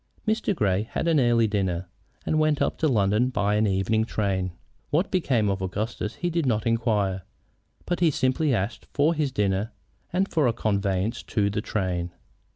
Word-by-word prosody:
Mr. 220 -2 +1
Grey 100 - +1
had 110 +9 -3
an 160 -3 +4
early 120 -2 +4
dinner 95 -4 -1 0.4
and 155 - +1
went 155 -1 +2
up - - +1
to 160 - +2
London 110 -1 +2
by 105 -5 0
an 105 +1 +2
evening 100 +3 +1
train. 95 -5 -1 0.4
What 165 +6 +1
became 130 - +1
of 95 -1 -1
Augustus 105 +3 -3
he 175 -1 -2
did 165 -4 0
not 110 -3 +1
inquire, 110 -5 +1 0.6
but 175 - -1
simply 130 +3 +1
asked 110 -2 -2
for 150 +3 +3
his 150 -4 -1
dinner 105 -1 0 0.4
and 185 +2 +1
for 155 -8 +2
a 115 - +2
conveyance 100 0 -1
to 100 -2 0
the 105 - -2
train. 90 -5 -2
110 Hz, 170 wpm, -25 LUFS, 100-145 Hz, 0.6 s, an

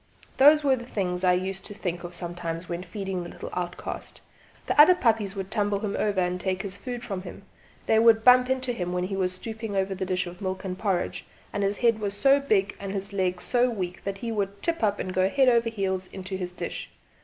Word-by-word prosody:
Those 295 +3 +7
were 275 -2 +4
the 240 - -7
things 180 -5 -2
I 180 -1 +5
used 190 +1 -2
to 205 - -9
think 175 -3 -4
of 175 0 -7
sometimes 170 -1 -5
when 170 0 -4
feeding 190 0 -4
the 175 - -7
little - - -8
outcast. 175 -1 -5 0.5
The 295 - +6
other 360 +4 +8
puppies 220 - +1
would 195 -1 -5
tumble 205 -2 0
him 205 -2 -2
over 205 -2 0
and 180 0 0
take 190 +1 -1
his 195 -1 -5
food 240 +4 -6
from 195 -6 -4
him; - - -10 0.4
they 220 - +4
would 225 -1 +5
bump 250 +1 +7
into 260 -1 0
him 180 -5 -3
when 180 0 0
he 195 +2 -3
was 185 -1 0
stooping 220 +2 -5
over 195 0 0
the 190 0 -4
dish 185 -1 0
of 175 +2 -9
milk 190 -1 -3
and 185 -1 -3
porridge, 190 -3 -2 0.3
and 205 - -1
his 200 +1 0
head 230 -2 +3
was 205 -1 -3
so 275 +6 +5
big 205 -7 +1
and 195 -1 -5
his 200 0 -3
legs 185 -2 -1
so 250 0 +2
weak 185 -6 -4
that 200 0 -3
he 230 +3 -4
would 200 -2 -3
tip 335 0 0
up 205 -2 +2
and 185 - -4
go 185 +1 +2
heels 260 0 +4
over 230 0 +2
head 190 -4 -2
into 190 0 -5
the 185 -1 -3
dish. 180 - -6
195 Hz, 235 wpm, -26 LUFS, 185-225 Hz, 0.5 s, other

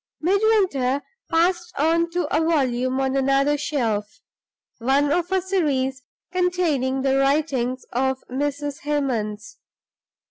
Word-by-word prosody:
Midwinter 360 - +2 0.3
passed 345 +2 +1
on 330 +3 +2
to 350 0 -1
a - - +3
volume 260 -5 +1
on 265 0 0
another 275 +2 +2
shelf 230 -8 -2 0.6
one 275 +4 +2
of 350 +3 0
a 380 -1 +1
series 275 -9 0 0.3
containing 335 -8 0
the 270 0 +2
writings 275 -3 0
of 265 +2 +1
Mrs. 290 +2 -3
Hemans. 250 -9 -2
280 Hz, 110 wpm, -23 LUFS, 260-335 Hz, 0.6 s, a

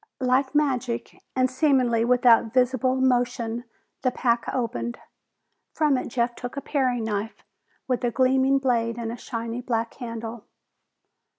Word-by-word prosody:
Like 260 +2 +1
magic, 255 -5 -1
and 255 0 +3
seemingly 255 -4 +2
without 240 -1 +4
visible 255 0 +2
motion, 245 -2 0 0.4
the 255 - +2
pack 240 -2 0
opened. 240 -1 -2 0.8
From 300 -3 +3
it 255 - -2
Jeff 240 0 0
took 245 +3 -7
a - - -2
paring 255 -6 0
knife 215 0 -3 0.4
with 250 -2 -1
a 240 - +2
gleaming 265 +2 +3
blade 235 -3 0
and 230 -1 -3
a - - -4
shiny 230 0 -5
black 230 -2 -2
handle. 230 -2 -7
245 Hz, 135 wpm, -25 LUFS, 235-260 Hz, 0.8 s, without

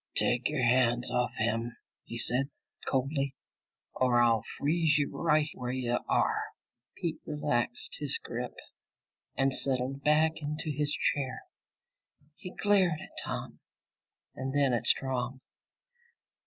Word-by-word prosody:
"Take 120 +2 +2
your 150 -4 -1
hands 120 0 +3
off 125 0 +1
him," 115 +1 -1 0.3
he 115 - -6
said 125 +4 +3 0.4
coldly, 135 +1 0 0.6
"or 125 -2 +3
I'll 115 -2 +4
freeze 155 0 +2
you 145 -1 -1
right 155 -2 +2
where 125 -1 -4
you 125 -2 -1
are!" - - +2 0.6
Pete 170 -3 -3
relaxed 150 - 0
his - - +3
grip 450 0 -6 0.8
and 135 0 +2
settled 135 +1 +1
back 155 +2 +3
into 150 +1 -2
his 145 0 0
chair. 135 -3 -1 0.9
He 185 0 -8
glared 190 -5 +2
at - - -11
Tom - - -5 0.7
and 130 +1 -4
then 140 -3 +3
at 120 - -1
Strong. 130 -1 0
135 Hz, 125 wpm, -30 LUFS, 125-150 Hz, 0.9 s, I'll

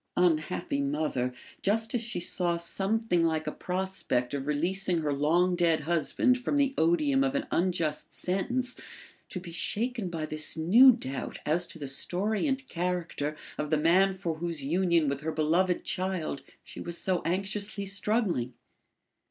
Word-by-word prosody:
Unhappy 155 -4 +1
mother, 140 -3 -1 0.3
just 220 +2 0
as 245 - 0
she 235 -6 -3
saw 175 0 0
something 195 +2 0
like 160 -1 +1
a - - -2
prospect 180 -9 -2
of 140 0 -3
releasing 175 +4 0
her 150 -2 0
long 170 +6 +2
dead 170 -3 +2
husband 170 - +1
from 250 +4 -1
the 280 -1 +2
odium 270 - +3
of 275 0 0
an 280 - 0
unjust 170 -4 0
sentence, 245 +8 -2 0.5
to 185 - -4
be 175 -1 -9
shaken 225 +4 -2
by 165 -2 -3
this 155 +1 -1
new 220 +12 +8
doubt 135 - -4
as 170 +4 +2
to - - -9
the 140 - -6
story 195 - 0
and 265 -1 -1
character 170 -4 -2 0.2
of 150 - -2
the 155 - +3
man 185 +5 +4
for 170 -4 -4
whose 170 -4 -2
union 170 +1 +2
with 140 +1 -2
her 160 +1 -2
beloved 170 +4 +1
child 185 -6 -2 0.2
she - - -9
was 170 0 -3
so 185 -1 +1
anxiously 200 +4 -1
struggling! 195 - 0
175 Hz, 160 wpm, -29 LUFS, 155-195 Hz, 0.5 s, new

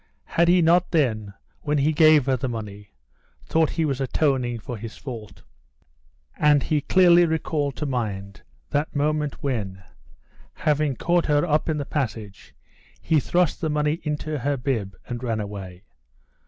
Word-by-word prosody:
Had 170 +1 +1
he 175 0 +5
not 170 +2 +4
then, 110 - 0 0.3
when 150 -1 0
he 145 +2 +2
gave 155 -3 +5
her 135 -1 +2
the 130 +1 -3
money, 105 -3 -7 0.6
thought 160 -1 +2
he 165 - -1
was 140 -2 -2
atoning 130 -3 0
for 115 +2 -7
his 110 0 -8
fault? 110 -8 -9 1.0
And 150 -2 +4
he 150 -2 0
clearly 175 +2 +5
recalled 155 -3 -1
to 150 - -4
mind 100 -7 -4 0.3
that 145 +2 -1
moment 150 0 -1
when, 100 -9 -3 0.7
having 150 -2 0
caught 175 +6 +1
her 145 +1 +3
up 155 0 +1
in 155 - 0
the 145 - -3
passage, 110 -9 -5 0.4
he 160 - +2
thrust 175 +3 0
the 160 - 0
money 150 +1 0
into 150 0 -3
her 140 +3 -1
bib 115 -8 -2
and 120 -1 -5
ran 115 -3 -2
away. 100 -3 -7
140 Hz, 155 wpm, -24 LUFS, 115-155 Hz, 1.0 s, he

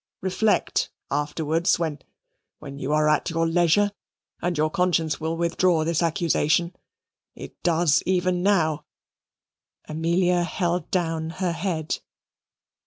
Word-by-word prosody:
Reflect, 190 +3 +1 0.2
afterwards 155 +4 0
when 160 -4 -2 0.6
when 140 -2 -9
you 135 +2 -3
are 150 0 +3
at 150 +3 +2
leisure, 170 +4 +2 0.5
and 175 -2 -1
your 155 +1 +1
conscience 175 -4 +1
will 160 +1 -2
withdraw 170 -1 +2
this 165 0 0
accusation. 170 +1 +1 0.6
It - - -11
does 165 -3 +3
even 180 -1 +1
now." 160 -6 +1 1.0
Amelia 175 +3 +1
held 175 -1 -1
down 165 -3 -1
her 185 -2 0
head. 165 -2 -2
170 Hz, 110 wpm, -24 LUFS, 155-180 Hz, 1.0 s, are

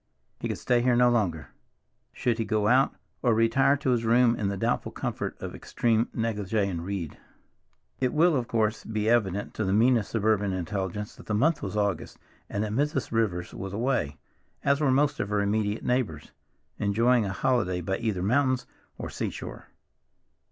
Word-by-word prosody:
He - - -3
could - - -3
stay 120 -1 +2
here 125 0 +3
no 125 0 +5
longer. 85 - 0 0.6
Should 120 -1 -1
he - - +2
go 110 -2 0
out, 130 +4 +4 0.3
or 120 -3 +3
retire 125 +5 +3
to 135 -2 0
his 120 -2 +1
room 120 +1 +4
in 105 - -2
the 100 0 -2
doubtful - - -1
comfort - - -4
of - - -6
extreme 115 0 0
negligee, 105 -3 -1
and 85 -4 -3
read? 90 -4 -5 0.8
It 130 -1 +1
will, 165 +1 +4
of 125 -3 -1
course, 110 -1 0
be 110 -1 -2
evident 105 -4 +1
to 110 - -2
the 95 -1 0
meanest 115 0 +3
suburban 105 -3 +1
intelligence 95 +3 -3
that - - -14
the 105 - 0
month 150 +8 +2
was 100 +1 -4
August, 100 -5 -1 0.3
and 100 - -1
that 105 - -3
Mrs. 140 +3 -1
Rivers 100 -7 -1
was 95 0 -6
away, 110 - -1 0.5
as 140 +1 +2
were 145 - +3
most 145 +2 +2
of 100 - -2
her 105 0 +1
immediate 105 +1 0
neighbors, 110 - -1 0.5
enjoying 115 +3 +3
a 95 - -2
holiday 100 -5 +1
by 95 +2 -2
either 105 -6 -1
mountains 130 +4 +2 0.3
or - - -5
seashore. - - -5
110 Hz, 180 wpm, -27 LUFS, 100-125 Hz, 0.8 s, no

